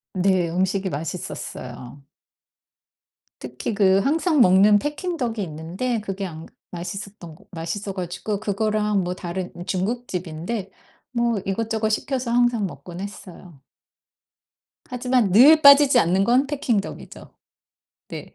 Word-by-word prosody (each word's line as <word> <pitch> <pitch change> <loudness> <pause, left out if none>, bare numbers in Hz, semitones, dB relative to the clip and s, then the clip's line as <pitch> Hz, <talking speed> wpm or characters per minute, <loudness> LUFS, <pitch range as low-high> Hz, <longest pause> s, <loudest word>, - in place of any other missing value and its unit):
네 185 -2 +2
음식이 190 +2 -1
맛있었어요. 140 -5 -7 1.4
특히 125 - -5
그 195 -2 +4
항상 305 - +2
먹는 200 +2 +6
Peking 330 - -4
duck이 230 -5 -2
있는데 180 +9 -3
그게 195 -1 -4
안 165 -3 -8 0.3
맛있었던거 180 0 -8
맛있어 190 +4 -5
가지고 185 +3 -4
그거랑 210 -1 0
뭐 180 +1 -3
다른 180 0 -5
중국집인데 190 -2 -3 0.4
뭐 235 -3 0
이것저것 220 +2 -1
시켜서 255 +1 -2
항상 240 -4 +2
먹곤 175 0 -10
했어요. 180 -6 -10 1.3
하지만 250 -5 0
늘 295 +9 +7
빠지지 280 -2 +7
않는 185 +1 +2
건 250 +5 +3
Peking 270 -8 0
duck이죠. - - -11 0.8
네. - - -9
200 Hz, 305 characters per minute, -23 LUFS, 180-235 Hz, 1.4 s, 늘